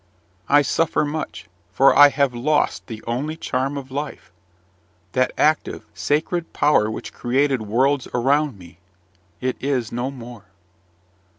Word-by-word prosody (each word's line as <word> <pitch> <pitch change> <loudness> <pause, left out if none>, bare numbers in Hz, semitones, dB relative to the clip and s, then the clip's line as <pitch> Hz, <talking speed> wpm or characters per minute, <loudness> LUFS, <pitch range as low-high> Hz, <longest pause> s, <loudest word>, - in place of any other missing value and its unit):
I 145 +1 +5
suffer 155 +2 +1
much, 150 +2 -5 0.3
for 135 +8 +4
I 145 0 +9
have 140 -3 +1
lost 145 +5 0
the 110 -2 -8
only 140 +7 -3
charm 135 -1 -2
of 135 -1 -8
life: 140 -9 -6 0.8
that 130 +5 +1
active, 155 +1 +1
sacred 160 +3 -1
power 130 -8 +3
which 110 - -7
created 130 +1 0
worlds 130 +6 +1
around 140 +1 +1
me, 85 -2 -15 0.6
it 130 -1 -1
is 130 -5 -1
no 120 +2 -2
more. 120 -5 -10
135 Hz, 130 wpm, -22 LUFS, 120-145 Hz, 0.8 s, I